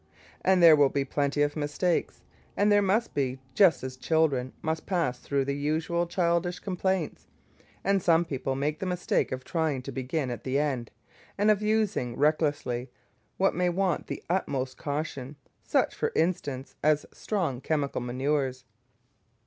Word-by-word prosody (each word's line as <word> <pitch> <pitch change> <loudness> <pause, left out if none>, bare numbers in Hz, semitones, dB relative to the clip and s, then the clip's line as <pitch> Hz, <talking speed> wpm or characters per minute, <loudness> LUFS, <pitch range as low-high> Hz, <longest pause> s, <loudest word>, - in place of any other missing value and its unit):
And 185 -2 +4
there 165 -2 +10
will 145 -2 +5
be 140 0 -1
plenty 145 +1 0
of 145 0 -1
mistakes, 155 +4 -1 0.3
and 205 +1 +3
there 205 0 +5
must 205 +4 +1
be, 135 -2 -1 0.2
just 170 -1 +4
as 130 0 -5
children 135 -2 +1
must 160 0 -2
pass 165 -10 0
through 140 0 -1
the 140 0 -1
usual 160 +4 0
childish 170 0 0
complaints. 190 -3 -2 0.6
And 195 0 +2
some 170 0 +4
people 135 -3 -3
make 150 +3 -1
the 190 - -3
mistake 180 -1 0
of 130 0 -4
trying 155 -4 -1
to - - -6
begin 135 +1 -2
at 115 -2 -6
the 130 +1 0
end, 135 -6 -1 0.5
and 205 +2 +4
of 210 -1 +1
using 210 - 0
recklessly 145 -4 +1 0.5
what 195 - +3
may 180 +1 +1
want 185 +1 0
the - - -5
utmost 135 -8 -1
caution, 145 -2 -4 0.3
such, - - +1
for - - -1
instance, 145 -6 -1
as 150 0 +2
strong 170 - -2
chemical 145 -4 -1
manures. 130 +1 -1
150 Hz, 155 wpm, -28 LUFS, 135-175 Hz, 0.6 s, there